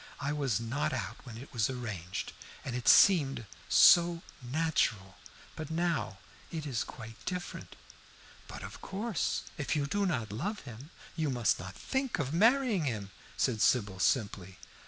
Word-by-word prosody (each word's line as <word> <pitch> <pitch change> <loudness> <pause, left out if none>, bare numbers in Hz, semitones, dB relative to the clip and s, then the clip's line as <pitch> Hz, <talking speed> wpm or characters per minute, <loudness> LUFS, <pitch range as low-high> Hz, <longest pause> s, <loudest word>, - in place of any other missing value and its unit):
"I 145 +1 -1
was 135 -8 0
not 120 +6 -1
out 110 -3 -3
when 115 -2 -8
it 130 +4 -11
was 115 -1 +1
arranged, 105 -8 -5 0.3
and 125 - -3
it 120 -2 -4
seemed 135 - +6 0.2
so 170 -1 +6 0.2
natural. 120 - 0 0.4
But 155 -2 -6
now 165 - -1 0.3
it 160 -2 -5
is 130 -5 -1
quite 115 -1 -10
different." 180 0 -5 0.7
"But - - -8
of - - -9
course, 205 0 -2 0.2
if 140 - -1
you 145 -2 +1
do 200 +7 0
not 115 - -2
love 195 - -3
him, 125 +3 -10 0.3
you 155 -3 0
must 120 -5 +1
not 95 +2 -8
think 265 -2 -2
of 145 -2 -2
marrying 225 - +3
him," 105 -7 -3 0.3
said 115 -5 +1
Sybil, 100 -6 +2
simply. 95 -5 0
135 Hz, 155 wpm, -31 LUFS, 110-165 Hz, 0.7 s, seemed